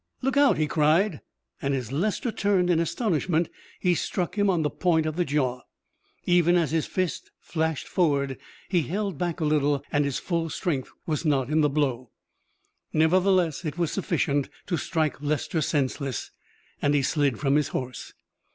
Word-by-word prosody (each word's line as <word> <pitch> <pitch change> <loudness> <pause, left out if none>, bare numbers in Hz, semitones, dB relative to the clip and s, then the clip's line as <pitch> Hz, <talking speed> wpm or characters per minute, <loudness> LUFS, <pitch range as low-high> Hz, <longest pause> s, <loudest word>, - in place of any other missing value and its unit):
"Look 270 +1 +1
out!" 285 -1 +5
he 155 - +2
cried, 155 +4 +2 0.4
and 140 0 0
as 125 -3 -4
Lester 210 - -1
turned 195 -4 +2
in 165 - +3
astonishment 170 - 0 0.3
he 180 -2 +3
struck 175 +2 -2
him 205 -1 +2
on 175 -4 +2
the 150 - 0
point 165 -3 +1
of 155 -1 -2
the 175 - +1
jaw. 130 -5 0 0.6
Even 175 0 +4
as 170 -4 +2
his 160 -1 0
fist 185 -3 -2
flashed 160 -2 -2
forward 140 -7 +1 0.3
he 180 -3 +2
held 190 - -3
back 175 -2 -2
a - - +1
little 145 -2 +2
and 145 0 +2
his 140 -2 -1
full 170 -2 -2
strength 145 -5 -2 0.2
was 155 0 -1
not 140 -3 +1
in 155 +1 +3
the 150 - +3
blow. 130 -4 -1 0.8
Nevertheless 180 0 +3
it 155 0 -4
was 170 -3 0
sufficient 145 -7 0 0.2
to 175 - -1
strike 155 -2 -1
Lester 155 +3 -1
senseless, 140 -3 -1 0.5
and 145 0 +2
he 140 - +2
slid 140 -3 +1
from 140 -1 +2
his 150 -2 +2
horse. 130 -1 -5
155 Hz, 170 wpm, -26 LUFS, 145-175 Hz, 0.8 s, out